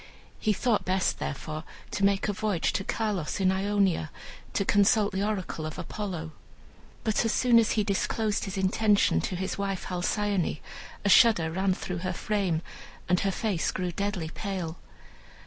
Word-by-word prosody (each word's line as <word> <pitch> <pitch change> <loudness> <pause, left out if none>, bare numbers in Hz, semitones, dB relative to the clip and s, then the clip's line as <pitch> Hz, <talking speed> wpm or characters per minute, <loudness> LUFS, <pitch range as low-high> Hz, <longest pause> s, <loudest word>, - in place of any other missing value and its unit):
He 215 - +1
thought 215 +2 +1
best, 185 0 0
therefore, 155 +2 -4 0.3
to 200 - -2
make 200 0 +3
a 205 - 0
voyage 210 -4 0
to 195 - -1
Carlos 205 -6 -2
in 190 -1 +3
Ionia, 195 -4 +1 0.4
to 200 - 0
consult 205 +1 +4
the 190 0 -2
oracle 200 -6 -2
of 155 0 -5
Apollo. 180 -3 -5 0.7
But 220 0 +1
as 225 - +1
soon 240 -2 +5
as 225 - +2
he 215 - +2
disclosed 210 +2 0
his 195 0 -5
intention 200 +2 +3
to 185 - -3
his 190 +2 -3
wife 195 -2 -2
Halcyone, 185 0 -1 0.5
a - - +3
shudder 190 -7 +6
ran 190 +2 +1
through 180 -2 -4
her 185 +1 -2
frame, 185 -4 -1 0.4
and 180 0 +3
her 195 - +1
face 195 -4 -1
grew 180 -1 -2
deadly 195 -3 -2
pale. 185 -5 -4
195 Hz, 165 wpm, -28 LUFS, 180-210 Hz, 0.7 s, shudder